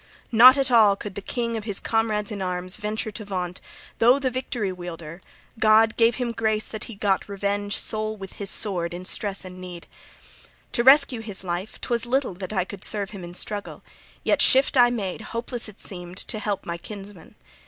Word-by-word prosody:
Not 250 +4 +9
at 270 -1 +2
all 215 -4 +6
could 200 0 -7
the 200 - -6
king 235 +2 -3
of 215 -2 -5
his 205 -3 +1
comrades 220 -2 0
in 205 -2 -5
arms 180 0 -3
venture 215 +1 -3
to 215 +1 -6
vaunt, 180 -3 -4 0.4
though 245 +4 +6
the 265 -2 -1
Victory 245 -5 -3
Wielder, 170 -1 -8 0.4
God, 220 +1 +5
gave 230 0 +3
him 245 -2 -2
grace 220 -1 0
that 220 - -6
he 230 - -9
got 200 -1 0
revenge 200 0 -1
sole 215 0 -2
with 195 -1 -9
his 200 -1 -2
sword 175 -6 +1
in 180 +1 -8
stress 200 0 -2
and 185 0 -9
need. 180 -2 -9 0.9
To 235 - +1
rescue 265 -2 +6
his 205 -4 -3
life, 180 +3 -4
'twas 235 -1 -2
little 260 -3 0
that 185 +1 -7
I 190 -4 0
could 195 -1 -9
serve 205 -2 0
him 195 -4 -8
in 175 0 -9
struggle; 205 +2 -4 0.4
yet - - +2
shift 265 +2 +5
I 245 -2 +6
made 215 -4 -3
(hopeless 235 0 -4
it 205 - -15
seemed) 180 -1 -5
to 215 - -3
help 205 -2 -3
my 170 0 -4
kinsman. 200 -3 -10
210 Hz, 195 wpm, -24 LUFS, 190-230 Hz, 0.9 s, Not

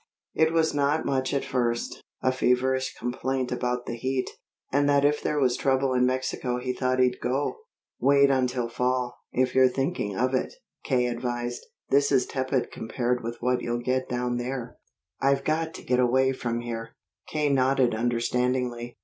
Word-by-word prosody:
It 160 0 +3
was 165 -1 +2
not 145 +2 +1
much 130 -1 0
at 140 - -1
first 120 -2 -1 0.2
a 130 - +3
feverish 130 +1 +1
complaint 130 +1 -2
about 125 0 -1
the - - -4
heat, 130 +2 -2 0.4
and 145 +1 +2
that 140 0 +4
if 150 +1 +2
there 150 - 0
was 125 -3 +3
trouble 135 -1 +1
in 125 0 +3
Mexico 130 -1 -1
he 125 +1 -2
thought 130 0 0
he'd 125 -1 +2
go. 135 - -1 0.4
"Wait 140 0 +5
until 125 -2 +1
fall, 125 +1 -1
if 130 0 +1
you're 130 0 +6
thinking 130 - -2
of 130 +1 +1
it," 130 - -1 0.3
K. 125 -3 +1
advised. 120 0 -3 0.3
"This 140 +1 +4
is 130 -3 +4
tepid 130 -1 -1
compared 120 +2 -2
with 115 +1 -4
what 125 +1 +1
you'll 120 0 -2
get 130 +1 0
down 125 0 -1
there." 125 0 -4 0.4
"I've 135 0 +2
got 160 +2 0
to - - -9
get 125 0 +2
away 130 +2 +3
from 120 -2 -3
here." 115 -1 -6 0.3
K. 150 -1 0
nodded 130 -2 +3
understandingly. 120 +1 -1
130 Hz, 170 wpm, -26 LUFS, 125-135 Hz, 0.4 s, you're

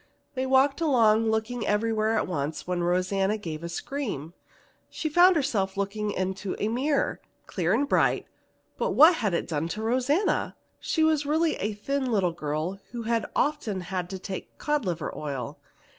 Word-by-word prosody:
They 260 -1 -2
walked 270 +3 +3
along 225 -7 +4
looking 220 +2 -1
everywhere 220 +1 +1
at - - +1
once 155 -3 -3
when 180 -1 -1
Rosanna 185 +4 +1
gave 165 -6 -6
a 170 - -4
scream. 175 - -4 0.6
She 315 - -3
found 355 +4 +6
herself 210 -11 0
looking 205 +2 -2
into 190 0 -3
a 210 - -1
mirror, 275 +5 0 0.2
clear - - -1
and 285 - +2
bright; - - +2 0.5
but - - 0
what 320 +3 +8
had 205 -7 0
it - - -2
done 160 -1 -1
to 215 +5 -4
Rosanna? 260 - +1 0.2
She 320 - 0
was 310 -2 +2
really 320 +2 +2
a 210 +2 -2
thin 265 +4 -2
little 190 -6 +1
girl 155 +4 -3
who 240 -1 -6
had 230 0 0
often 235 -10 0
had 180 0 -4
to 190 - -5
take 190 0 -7
cod 295 -4 -1
liver 170 -4 -3
oil. 135 -6 -5
215 Hz, 170 wpm, -27 LUFS, 185-275 Hz, 0.6 s, what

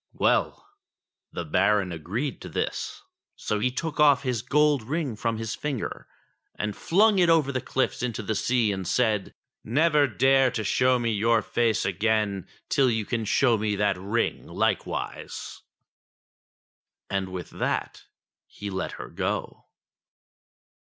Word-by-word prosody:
Well! - - +1 0.6
the 85 - -5
Baron 95 +3 +2
agreed 105 - -4
to - - -8
this. - - -3 0.3
So 105 - -2
he 125 +4 +2
took 155 +5 -4
off 145 -2 +5
his 125 -4 -1
gold 150 0 +3
ring 140 +1 -2
from 115 +1 -2
his 110 -1 -3
finger 145 -5 -4 0.5
and 105 -1 -3
flung 205 +3 +3
it 175 -2 +4
over 155 -4 +4
the 130 -2 -2
cliffs 130 +1 -1
into 120 -3 -3
the 110 - -1
sea 115 0 +1
and 95 -2 -4
said: 110 -3 0 0.2
*' - - -66
Never 150 +4 +3
dare 135 +3 +4
to 115 -2 -3
show 125 +5 +3
me 120 -1 0
your 110 +2 +2
face 115 -3 +1
again 100 0 0 0.2
till 135 -2 +3
you 110 -2 -1
can 115 0 -2
show 115 +1 +3
me 105 -1 0
that 100 -1 +1
ring 100 +6 -2
likewise." - - -3 1.5
And 95 -1 -2
with 90 -2 -7
that - - -3 0.4
he 105 -1 -7
let 95 0 -3
her - - -7
go. - - -4
115 Hz, 145 wpm, -26 LUFS, 105-135 Hz, 1.5 s, off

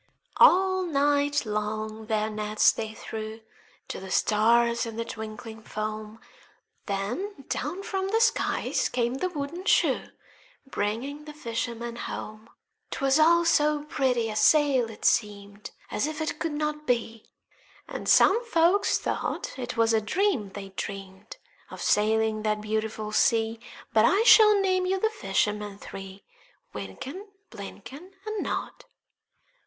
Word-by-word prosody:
All 375 0 +5
night 290 -4 +1
long 215 +1 -3
their 215 -1 0
nets 215 0 +2
they 220 -1 -6
threw 220 0 -7 0.5
To - - -5
the 190 0 -9
stars 235 +4 +2
in 225 - -7
the 230 0 -3
twinkling 220 0 -8
foam,— 215 0 -5 0.7
Then 265 - -4
down 345 +8 -3
from 385 -1 -2
the 445 +3 +1
skies 465 +1 +1
came 240 0 0
the 320 +8 -2
wooden 330 +2 -5
shoe, - - +2 0.6
Bringing 270 +5 -3
the 300 -1 -10
fishermen 235 -2 -4
home: 215 -1 -7 0.4
'Twas 275 +2 +1
all 340 +2 +5
so 300 -2 +2
pretty 255 -6 0
a - - -6
sail, 275 -2 +4
it 220 - -9
seemed 205 -2 0 0.2
As 275 - 0
if 310 0 -5
it 315 -1 -3
could 330 -2 -2
not 300 0 -3
be; 230 -2 -2 0.6
And - - -5
some 450 +5 +5
folk 360 -1 +3
thought - - -2
'twas 230 -2 +1
a 220 - +3
dream 265 - 0
they'd 195 -1 -9
dreamed 195 +1 -7 0.3
Of - - -10
sailing 220 +1 +2
that 215 0 0
beautiful 215 0 -3
sea; 225 +1 +2 0.3
But 220 0 +5
I 395 - +4
shall 425 -3 +7
name 370 -1 +1
you 380 +1 0
the 440 +3 +1
fishermen 210 - -1
three: 195 -1 -10 0.5
Wynken, 370 +11 -7 0.2
Blynken, 260 - -10
And 430 -1 -3
Nod. - - -4
235 Hz, 135 wpm, -27 LUFS, 215-310 Hz, 0.7 s, shall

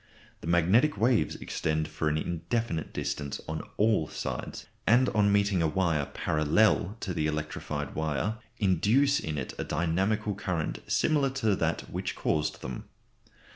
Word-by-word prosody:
The - - -8
magnetic 95 - +3
waves 115 +2 +2
extend 80 0 -2
for 75 0 -1
an 75 - 0
indefinite 85 +3 -2
distance 70 -2 -3
on 80 0 -3 0.2
all 105 -7 +3
sides, - - -5 0.2
and 125 +4 +5
on 100 -1 +3
meeting 100 -3 +2
a 80 - +3
wire 80 -4 +1
parallel 90 +6 +2
to 95 - -3
the 75 -2 0
electrified 75 -2 -3
wire 80 +8 -1 0.2
induce 110 - +3
in 75 -1 -4
it 65 - -4
a - - 0
dynamical 95 +6 0
current 90 -5 -2
similar 145 -3 +2 0.2
to 105 -3 +4
that - - 0
which - - -3
caused 75 0 -1
them. 65 -1 -5
85 Hz, 145 wpm, -29 LUFS, 75-105 Hz, 0.2 s, and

